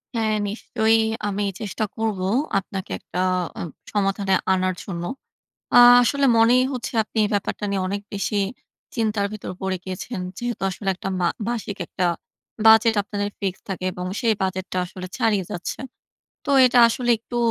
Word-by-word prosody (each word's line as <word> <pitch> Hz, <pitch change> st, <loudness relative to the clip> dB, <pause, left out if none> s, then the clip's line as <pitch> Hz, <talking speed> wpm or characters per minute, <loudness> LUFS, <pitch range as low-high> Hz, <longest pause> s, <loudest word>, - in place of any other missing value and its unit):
হ্যাঁ, 220 Hz, -1 st, +1 dB
নিশ্চয়ই 225 Hz, +1 st, +1 dB, 0.3 s
আমি 205 Hz, 0 st, -1 dB, 0.2 s
চেষ্টা 215 Hz, +1 st, -3 dB
করব 220 Hz, -3 st, -1 dB, 0.4 s
আপনাকে 190 Hz, 0 st, -7 dB
একটা 180 Hz, -, -6 dB, 0.4 s
আ -, -, -3 dB, 0.3 s
সমাধানে 195 Hz, -1 st, +1 dB, 0.2 s
আনার 185 Hz, 0 st, 0 dB
জন্য। 175 Hz, -3 st, -5 dB, 0.7 s
আ -, -, +9 dB, 0.2 s
আসলে 280 Hz, +3 st, +2 dB
মনেই 240 Hz, +3 st, +5 dB
হচ্ছে 250 Hz, -1 st, -4 dB
আপনি 220 Hz, -, -6 dB
এই -, -, 0 dB
ব্যাপারটা 205 Hz, +1 st, -2 dB
নিয়ে 195 Hz, -1 st, 0 dB
অনেক 200 Hz, +1 st, -3 dB
বেশি 200 Hz, +1 st, -1 dB, 0.6 s
চিন্তার 215 Hz, -3 st, 0 dB
ভেতর 210 Hz, -3 st, -6 dB
পড়ে 190 Hz, -1 st, -1 dB
গিয়েছেন। 185 Hz, +4 st, -5 dB, 0.2 s
যেহেতু 240 Hz, -4 st, -4 dB
আসলে 195 Hz, +2 st, -5 dB
একটা 190 Hz, +1 st, -5 dB
মা 175 Hz, -, +3 dB, 0.2 s
মাসিক 220 Hz, -4 st, -3 dB
একটা 180 Hz, -, -1 dB, 0.6 s
বাজেট 225 Hz, +1 st, +7 dB
আপনাদের 205 Hz, 0 st, -3 dB
ফিক্স 190 Hz, -2 st, -2 dB
থাকে 185 Hz, -1 st, -4 dB
এবং 180 Hz, +1 st, -5 dB
সেই 230 Hz, -3 st, +2 dB
বাজেটটা 185 Hz, 0 st, -3 dB
আসলে 185 Hz, +1 st, -8 dB
ছাড়িয়ে 210 Hz, -4 st, +1 dB
যাচ্ছে। 175 Hz, -, -4 dB, 0.7 s
তো 290 Hz, -, -3 dB, 0.2 s
এটা 250 Hz, 0 st, +3 dB
আসলে 240 Hz, +1 st, -1 dB
একটু 240 Hz, +2 st, -8 dB
205 Hz, 155 wpm, -23 LUFS, 190-225 Hz, 0.7 s, আ